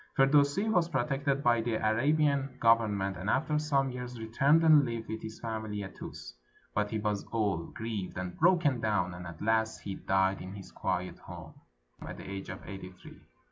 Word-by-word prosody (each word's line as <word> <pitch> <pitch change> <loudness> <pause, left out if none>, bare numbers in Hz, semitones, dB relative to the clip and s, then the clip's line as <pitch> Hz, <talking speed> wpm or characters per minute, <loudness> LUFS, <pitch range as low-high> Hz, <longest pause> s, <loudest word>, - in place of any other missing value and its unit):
Firdusi 145 +7 +4
was 180 -6 +2
protected 140 0 0
by 120 -1 +4
the 115 0 -1
Arabian 135 +4 +1
Government, 105 -5 +2
and 95 +4 -3
after 150 +4 +1
some 140 -3 +1
years 125 -1 -6
returned 135 +8 +3
and 155 -3 +7
lived 115 -3 -4
with 110 0 -5
his 110 0 -8
family 110 -2 -4
atTus; 80 -9 -9 0.4
but 105 0 0
he 110 - -2
was 105 -1 -1
old, 100 -7 -1
grieved, 110 -5 -4
and 90 -1 -4
broken 165 -7 +3
down, 100 -5 0
and 90 0 -8
at 85 +1 -8
last 110 0 +1
he 100 - -5
died 95 0 +1
in 95 +2 -7
his 100 - -10
quiet - - -3
home, - - -10 0.5
at - - -7
the - - -9
age 95 -1 -6
of 95 - -8
eighty 95 -2 -7
three. 90 0 -15
110 Hz, 180 wpm, -30 LUFS, 100-140 Hz, 0.5 s, and